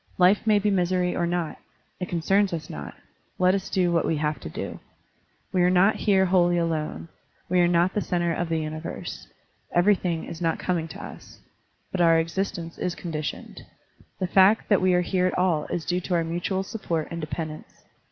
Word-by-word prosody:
Life 190 +5 +4
may 215 -1 +5
be 205 0 +1
misery 180 -1 +1
or 175 - 0
not; 175 -2 -2 0.4
it 180 - -4
concerns 190 +3 +2
us 160 -2 -5
not; 75 -1 -7 0.4
let 185 0 +4
us 195 -1 -2
do 180 -2 +1
what 165 -1 +2
we 160 - 0
have 150 -2 -1
to - - -7
do. - - -6 0.7
We 185 - +3
are 180 - +5
not 185 +4 +4
here 195 -3 +3
wholly 175 -1 +3
alone, 155 - -2 0.4
we 180 0 +3
are 175 - +5
not 175 +1 +2
the 210 - 0
center 175 -3 0
of 170 0 -2
the 165 - +1
universe, 155 +1 -5 0.5
everything 175 -2 +2
is 170 - -8
not 165 -1 +1
coming 170 -3 -1
to - - -9
us. - - -11 0.5
But 185 - -1
our 165 -1 +6
existence 165 0 -3
is 180 - -2
conditioned. 155 -3 -5 0.6
The 185 - 0
fact 190 +4 +4
that 205 - +4
we 185 -1 +3
are 180 - +3
here 180 +1 +1
at - - -2
all 180 -4 +1
is 165 - -4
due 180 0 0
to 180 0 -1
our 170 - +2
mutual 175 +3 -2
support 170 -6 -3
and 170 0 -4
dependence. 155 0 -6
175 Hz, 195 wpm, -25 LUFS, 165-185 Hz, 0.7 s, our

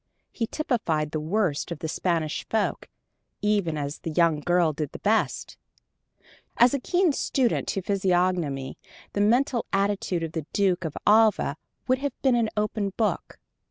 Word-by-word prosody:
He 230 - -2
typified 170 - -1
the 155 - -2
worst 165 -1 -1
of 170 - -3
the 160 - -5
Spanish 160 -2 -1
folk, 220 -2 -1 0.5
even 200 -7 +1
as 145 0 -4
the - - -5
young 165 -1 +2
girl 175 0 +2
did 150 -1 -4
the - - -6
best. 215 +2 0 1.0
To 245 +3 +6
a - - -1
keen 355 +5 +2
student 260 -6 0
of 190 - -3
physiognomy 180 -8 0 0.3
the 205 - 0
mental 240 +3 +2
attitude 195 -3 0
of 165 - -4
the 160 -2 -5
Duke 185 -3 +1
of 155 - -4
Alva 215 -8 +4 0.3
would 255 0 +2
have 285 0 -4
been 265 -2 +4
an 230 -2 +1
open 210 -2 -1
book. 220 -2 -1
195 Hz, 160 wpm, -26 LUFS, 160-220 Hz, 1.0 s, To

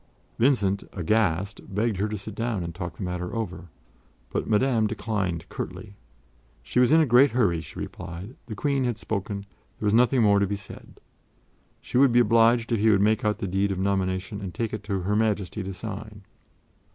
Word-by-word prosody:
Vincent, 105 -6 +2
aghast, 100 0 0
begged 110 -1 +1
her 100 +3 0
to 105 - -3
sit 100 +2 -8
down 115 -3 -2
and 85 0 -5
talk 85 -2 -6
the - - -5
matter 90 +2 -4
over, 90 -6 -4 0.6
but - - -2
Madame 115 0 +3
declined 105 -6 -2
curtly. 105 -3 -7 0.7
She 95 - 0
was 125 +2 +4
in 160 - +7
a 160 - +5
great 130 +1 +5
hurry, 100 -10 +2
she 80 - -11
replied; 90 +6 -7
the 110 - -6
Queen 140 +3 0
had 120 -3 -1
spoken; 100 -2 -4 0.3
there - - -4
was 105 - +2
nothing 125 +1 +4
more 100 -1 +5
to 100 - +2
be 100 - -2
said. 100 - -12 0.8
She 125 - 0
would 135 -2 +6
be 120 - +5
obliged 115 +1 +4
if 115 - +2
he 110 +2 +4
would 100 -3 +5
make 110 +2 +2
out 105 -1 +1
the 105 -3 -3
deed 95 +2 0
of 95 - -2
nomination 95 +1 -1
and 90 -4 -6
take 115 +2 -2
it 110 - -3
to 100 -3 -2
Her 100 +4 0
Majesty 105 -2 0
to 95 0 -5
sign. 105 +1 -7
105 Hz, 200 wpm, -26 LUFS, 95-115 Hz, 0.8 s, in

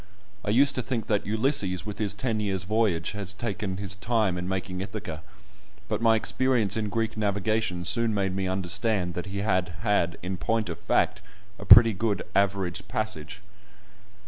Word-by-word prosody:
I - - -3
used 140 +6 +5
to 130 - -1
think 120 -2 -3
that 105 -2 0
Ulysses 110 - 0
with 105 -1 -6
his 100 -2 -1
ten 110 0 -1
years' 95 -3 -1
voyage 105 -4 0
had 105 -2 -6
taken 100 -4 -3
his 100 0 -3
time 105 -2 0
in 90 0 -4
making 95 -1 -3
Ithaca, 80 -5 -6 0.7
but - - -2
my 115 -1 +5
experience 115 -3 +1
in 110 -2 -1
Greek 115 0 -1
navigation 105 -3 -1
soon 115 +3 +1
made 95 -3 -1
me 95 -1 -1
understand 95 0 0
that 90 +2 -5
he 100 +1 -3
had 90 -4 0
had, 90 -4 +1
in 95 +1 -3
point 110 +2 -1
of 85 - -5
fact, - - +1 0.4
a - - -8
pretty 115 -2 +9
good 105 +1 -1
"average 95 -3 0
passage." 95 -3 -3
100 Hz, 170 wpm, -27 LUFS, 95-110 Hz, 0.7 s, pretty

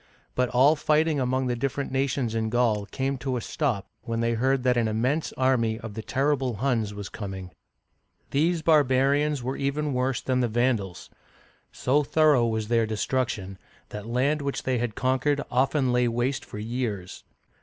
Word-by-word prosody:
But 125 -1 +1
all 135 +5 +5
fighting 155 0 +2
among 130 +1 0
the 125 -1 0
different 140 +3 -2
nations 135 -3 0
in 110 -1 -1
Gaul 110 -4 +1
came 135 +4 -2
to 130 -1 -2
a - - -1
stop 120 -10 -1 0.2
when 115 -1 -3
they 115 0 +1
heard 130 +3 +1
that 125 -1 +3
an 120 -2 +2
immense 125 +9 0
army 115 -4 +1
of 110 -3 -8
the 110 - -5
terrible 135 0 0
Huns 115 -3 0
was 100 -1 -6
coming. 95 -4 -7 0.8
These 160 +3 +1
barbarians 145 -2 +3
were 130 +2 -3
even 145 +1 -1
worse 125 0 0
than 130 -1 0
the 125 - +2
Vandals; 115 -5 -1 0.6
so 140 +4 +1
thorough 150 -4 +3
was 110 -1 -2
their 115 -1 +2
destruction, 110 -4 -2 0.3
that 105 +1 -7
land 135 +6 +1
which 140 -1 -3
they 130 -2 0
had 120 -2 -2
conquered 130 +3 +1
often 130 +1 +2
lay 125 0 +3
waste 125 +4 -1
for - - -9
years. 110 -4 -4
125 Hz, 170 wpm, -26 LUFS, 115-140 Hz, 0.8 s, all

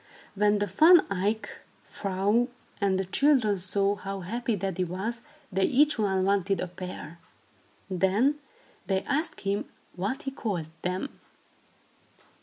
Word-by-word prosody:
When 205 0 +3
the 205 - +1
Van 315 - +6
Eyck 205 +3 -1 0.3
vrouw 200 +5 +1 0.3
and 195 -1 +2
the 190 - -1
children 225 -2 +3
saw 200 +2 +1
how 195 -1 -5
happy 230 +5 -2
Daddy 190 -1 -2
was, 195 +7 -3 0.3
they 190 +1 +2
each 295 0 +3
one 190 -3 +1
wanted 195 0 +1
a - - -1
pair. 180 -2 -8 0.7
Then 200 +10 +2 0.5
they 190 -1 +1
asked 305 +4 -2
him 200 +1 -1 0.3
what 215 - -3
he 270 - -3
called 190 - -3
them. 185 +9 -3
200 Hz, 130 wpm, -28 LUFS, 190-230 Hz, 0.7 s, Van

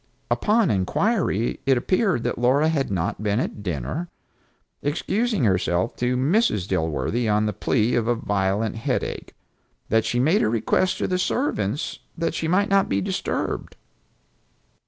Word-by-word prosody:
Upon 215 -3 +2
inquiry 115 - 0
it 135 -2 +4
appeared 185 - +1
that - - -2
Laura 135 +6 +3
had 145 -4 0
not 95 +1 -2
been 105 +1 +1
at 110 - -3
dinner, 90 - -3 0.7
excusing 200 - 0
herself 90 -1 +1
to 125 +1 0
Mrs. 135 - +2
Dilworthy 85 - -1
on 105 +1 +2
the 105 - -1
plea 115 +3 +1
of 115 -2 +1
a 120 - +2
violent 105 +1 -1
headache; 115 - -3 0.5
that 110 0 +3
she 120 +2 -1
made 160 +11 +3
a - - +2
request 115 - +1
to - - -1
the 180 0 0
servants 150 - -1 0.2
that 165 0 -1
she 160 - -2
might 200 +5 +2
not 195 0 +3
be 100 - +1
disturbed. 95 - -3
120 Hz, 150 wpm, -23 LUFS, 100-170 Hz, 0.7 s, it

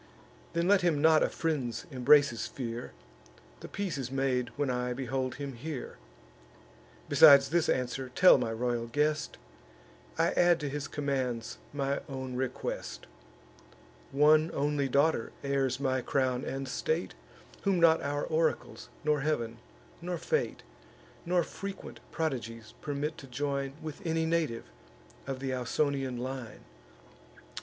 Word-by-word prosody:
Then 170 +1 +1
let 200 0 +5
him 170 -4 +2
not 160 +1 +5
a - - +2
friend's 140 -8 -2
embraces 135 -1 +4
fear; 120 -2 -5 0.7
The - - -8
peace 195 -7 -3
is 130 -2 -3
made 130 -2 0
when 145 -3 0
I 125 0 -1
behold 130 0 -2
him 140 0 -5
here. 135 +3 -6 1.1
Besides 140 -3 +8
this 170 +1 +2
answer, 130 +1 -1
tell 180 -6 +7
my 115 -2 -1
royal 120 0 -1
guest, 150 +4 0 0.8
I - - +3
add 175 -1 +4
to 145 - -2
his 145 0 -4
commands 130 -6 -2
my 140 -1 -1
own 130 -2 -5
request: 130 0 -4 1.1
One 155 +3 +5
only 145 -1 0
daughter 140 -2 +2
heirs 140 -2 0
my 130 -2 0
crown 130 -1 0
and 135 0 -4
state, 470 - -2 0.5
Whom 195 -3 +2
not 165 -1 +5
our 145 +1 -2
oracles, 160 0 -1
nor 150 -1 +2
Heav'n, 120 -6 -1 0.4
nor 175 0 -3
fate, 470 - -1 0.6
Nor 175 0 +3
frequent 200 +4 -7
prodigies, 115 -8 -3
permit 150 +2 -3
to 135 - -11
join 140 +1 -2
With 155 +5 -7
any 165 -1 0
native 160 -8 0 0.6
of 135 -1 -3
th' 135 -1 -2
Ausonian 130 +1 -1
line. 130 -2 -6
140 Hz, 130 wpm, -30 LUFS, 130-155 Hz, 1.1 s, Besides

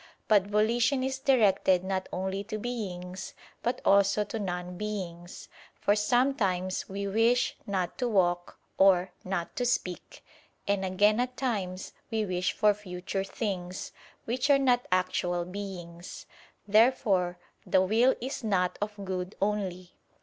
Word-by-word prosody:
But 205 -3 +4
volition 235 +6 +2
is 265 0 -2
directed 200 -9 +3
not 190 0 -2
only 190 +2 -2
to 215 0 -4
beings, 190 -6 -5 0.3
but 240 - -1
also 200 +1 +4
to 215 +2 -5
non 180 -2 -4
beings. 180 -4 -6 0.3
For 205 - +3
sometimes 210 -5 +1
we 200 +1 -4
wish 225 +5 +2
"not 185 -3 -2
to 250 - +1
walk," 175 -5 +1 0.2
or 185 -1 +5
"not 185 -2 -3
to 245 - 0
speak"; 185 -7 -2 0.4
and 200 -1 +1
again 205 +4 +3
at 250 0 -2
times 195 -8 -3 0.2
we 220 -2 0
wish 180 -1 0
for 210 -1 +3
future 190 -1 -4
things, 190 -3 -4 0.3
which 250 +5 -1
are 280 - +7
not 250 -3 +2
actual 180 -1 0
beings. 180 -3 -8 0.4
Therefore 205 -5 +3 0.3
the 185 - +3
will 230 +7 +3
is 260 +1 -5
not 185 -4 0
of 205 -1 -4
good 185 0 -4
only. 190 -3 -2
200 Hz, 135 wpm, -29 LUFS, 185-225 Hz, 0.4 s, are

